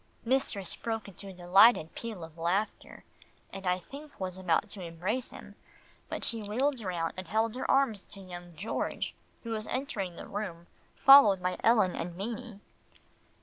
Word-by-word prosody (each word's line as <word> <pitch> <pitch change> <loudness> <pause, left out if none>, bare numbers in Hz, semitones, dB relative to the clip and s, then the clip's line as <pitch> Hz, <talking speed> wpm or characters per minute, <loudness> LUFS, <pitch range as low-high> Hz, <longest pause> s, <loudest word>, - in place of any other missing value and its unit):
Mistress 230 -7 0
broke 225 -2 -4
into 200 +1 -10
a - - -7
delighted 180 0 +5
peal 220 -7 -6
of 160 -1 -10
laughter, 175 +6 -2 0.5
and 195 -1 -6
I 180 0 +3
think 280 +10 -12
was 185 -1 -3
about 185 +1 +1
to 200 - -8
embrace 185 +9 -3
him, - - -12 0.6
but - - -4
she 230 -1 0
wheeled 250 +5 0
round 175 -5 -2
and 185 -2 -6
held 220 +4 +1
out - - -5
her - - -3
arms 270 -7 +3
to 200 - -13
young 175 -2 -10
George 200 +8 -3 0.3
who 230 - -5
was 215 -1 -3
entering 205 -9 -3
the - - -8
room, 185 -5 -5 0.3
followed 270 -9 +8
by 180 0 -1
Ellen 215 -6 +4
and 170 0 -5
Beanie. 220 0 -6
200 Hz, 170 wpm, -30 LUFS, 180-230 Hz, 0.6 s, followed